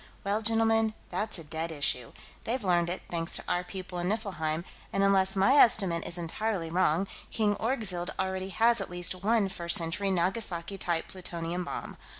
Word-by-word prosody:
Well, 205 +2 0
gentlemen, 225 0 +3 0.2
that's 210 +4 -1
a 165 - -7
dead 160 +2 -4
issue. 135 -6 0 0.3
They've 240 +1 -2
learned 175 -2 +2
it, 180 - -3
thanks 165 -1 0
to - - -2
our 175 - 0
people 180 -1 -7
on 175 +1 -1
Niflheim, 175 -7 -2 0.3
and 195 - +1
unless 195 -1 +3
my 195 +7 +4
estimate 195 - +4
is 170 - -4
entirely 175 0 -3
wrong, 180 +1 +2 0.2
King 210 -2 +1
Orgzild 215 -8 0
already 190 0 -2
has 230 +2 +3
at 195 - -5
least 180 +1 0
one 220 -1 +3
First 170 -2 +4
Century 170 +4 0
Nagasaki 185 0 -1
type 170 -2 -1
plutonium 175 -1 -4
bomb. - - -6
185 Hz, 170 wpm, -29 LUFS, 170-210 Hz, 0.3 s, my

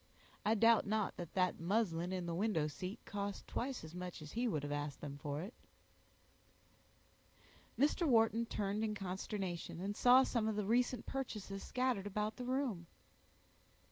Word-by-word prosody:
I 220 - +3
doubt 230 0 +5
not 215 -1 0
that 170 -2 -7
that 185 -1 +2
muslin 175 -1 +1
in 185 -2 -2
the 170 - -2
window 180 -4 +1
seat 185 +8 -5
cost 200 -1 -4
twice 255 -3 -3
as 160 0 -9
much 180 0 -5
as 150 - -9
he 240 +2 0
would 155 -10 -1
have 145 - -3
asked 145 -1 -3
them 140 -1 -6
for 145 +1 -3
it." 205 +6 -7 2.2
Mr. 300 +5 +3
Wharton 230 -2 +4
turned 205 0 -1
in 215 -1 0
consternation, 190 -2 -4
and 200 +3 -3
saw 250 +3 +7
some 235 -4 0
of 220 - 0
the 210 -1 -1
recent 245 +2 +2
purchases 210 -7 -4
scattered 250 -6 0
about 210 +2 -2
the 250 - -4
room. 250 -10 -1
205 Hz, 165 wpm, -37 LUFS, 180-230 Hz, 2.2 s, saw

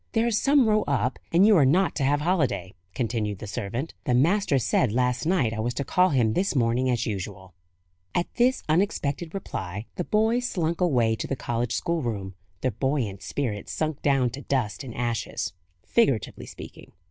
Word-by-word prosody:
"There's 225 -2 +2
some 275 -4 +4
row 215 0 +3
up, 130 -3 0
and 175 +4 +5
you 215 -1 +6
are 150 - +6
not 175 +8 +3
to - - 0
have 145 +2 +2
holiday," 150 - 0 0.2
continued 110 -4 -1
the 105 - -8
servant; 115 +7 -4
"the 125 - +2
master 165 +3 +3
said 125 -1 +2
last 125 +4 0
night 150 -11 +2
I 110 - -4
was 120 +2 -1
to 140 - -1
call 180 +5 +3
him 120 -7 +2
this 190 - 0
morning 125 +1 +2
as 120 -1 0
usual." 95 -3 -5 0.6
At 175 - +2
this 250 +2 +3
unexpected 160 -2 0
reply, 100 - -5
the 180 - 0
boys 225 +5 +1
slunk 170 0 -1
away 120 -10 +3
to - - -4
the 135 - -1
college 120 -2 -2
schoolroom, 115 - -2 0.3
their 130 - +1
buoyant 115 -4 -1
spirits 105 -1 -3
sunk 155 -2 -2
down 135 -4 +2
to 135 +4 -7
dust 125 -4 -1
and 120 -4 -8
ashes 120 -5 -2 0.3
figuratively 135 - +1
speaking. - - -11
135 Hz, 180 wpm, -26 LUFS, 115-175 Hz, 0.6 s, you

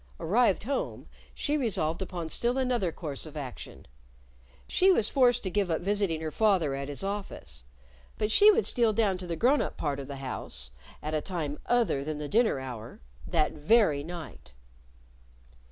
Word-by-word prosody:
Arrived 210 +2 +2
home, 275 +5 -3 0.3
she 295 - -1
resolved 190 - 0
upon 175 -3 -4
still 240 +9 +1
another 245 -9 0
course 155 -3 -5
of 155 0 -9
action. 135 -4 -8 0.8
She 380 +1 +4
was 225 - +3
forced 245 -3 +3
to 185 - -3
give 200 -1 0
up 160 - 0
visiting 195 -4 0
her 160 -1 -3
father 190 -10 +2
at 140 0 -4
his 145 +5 -4
office. 195 - -5 0.5
But 210 0 -1
she 415 - +7
would 440 +1 +4
steal 230 -3 +4
down 200 -4 +1
to 180 - -7
the 170 - -2
grown 255 - +3
up - - -4
part 145 -2 -2
of 135 - -7
the 140 - -6
house 125 - -6 0.3
at 155 +1 -3
a 155 - +1
time 155 -6 -4
other 235 - +2
than 155 +1 -4
the 150 0 -4
dinner 220 - +2
hour 120 -3 -8 0.3
that 155 -2 +1
very 155 -2 +3
night! 170 - -9
175 Hz, 175 wpm, -28 LUFS, 150-225 Hz, 0.8 s, she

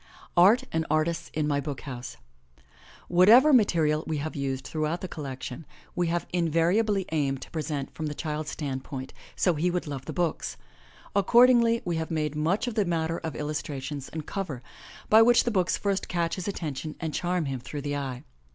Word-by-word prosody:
ART 200 +9 +6
AND 160 0 0
ARTISTS 165 +2 0
IN 150 -1 -1
MY 145 -1 +1
BOOK 145 -1 -5
HOUSE. 125 -3 -7 0.9
HATEVER 225 +12 +7
material 160 - +3
we 155 - -1
have 150 +2 -4
used 135 -2 -3
throughout 155 +2 -2
the 185 - -4
collection 135 -2 -6 0.3
we 175 -1 +1
have 170 +1 -1
invariably 180 +5 +2
aimed 140 -4 0
to - - -14
present 150 -3 -3
from 155 - -4
the 150 - -4
child's 155 -1 -3
standpoint, 135 -2 -5 0.2
so 180 - +2
he 165 +3 +1
would 180 0 -2
love 140 -3 -6
the - - -5
books. 175 -2 -2 0.6
Accordingly, 235 +2 +5
we 170 -2 -1
have 160 0 -3
made 155 -2 -1
much 170 +9 +1
of 245 - -3
the 215 -1 +2
matter 165 -1 -1
of 160 -2 -5
illustrations 145 -2 -4
and 160 -2 -6
cover, 160 -11 -4 0.4
by 220 +1 +7
which 240 +1 +6
the 240 - 0
books 185 -4 +1
first 200 -1 -1
catch 170 -2 -1
his 185 - -4
attention 155 -5 -4
and 160 -3 -3
charm 175 -2 0
him 135 -2 -3
through 145 +4 -6
the 145 0 -3
eye. 130 -3 -4
160 Hz, 185 wpm, -27 LUFS, 145-180 Hz, 0.9 s, HATEVER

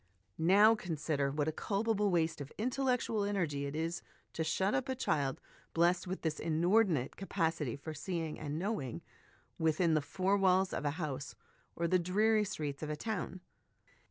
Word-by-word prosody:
Now, 200 +7 +6
consider 155 -8 -1
what 145 +1 -1
a - - +2
culpable 210 +4 0
waste 165 -4 +1
of 140 - -7
intellectual 250 -2 0
energy 165 -9 -1
it 140 - -5
is 165 +2 -2 0.3
to 160 - -1
shut 190 +5 +1
up 265 0 0
a 260 - 0
child, 140 - 0 0.4
blessed 170 +1 +3
with 185 +1 -4
this 155 -2 -1
inordinate 170 - +2
capacity 165 - -1
for 155 +2 -7
seeing 160 0 -3
and 150 0 -4
knowing, 160 - -3 0.6
within 160 +1 +2
the 155 - +3
four 190 +7 +1
walls 190 -1 +3
of - - -3
a - - +3
house, 145 -4 -4 0.4
or 170 - 0
the 185 +2 +3
dreary 210 +5 +3
streets 150 -8 -4
of 155 - -4
a 150 - -1
town. 185 -1 -4
170 Hz, 165 wpm, -33 LUFS, 150-200 Hz, 0.6 s, Now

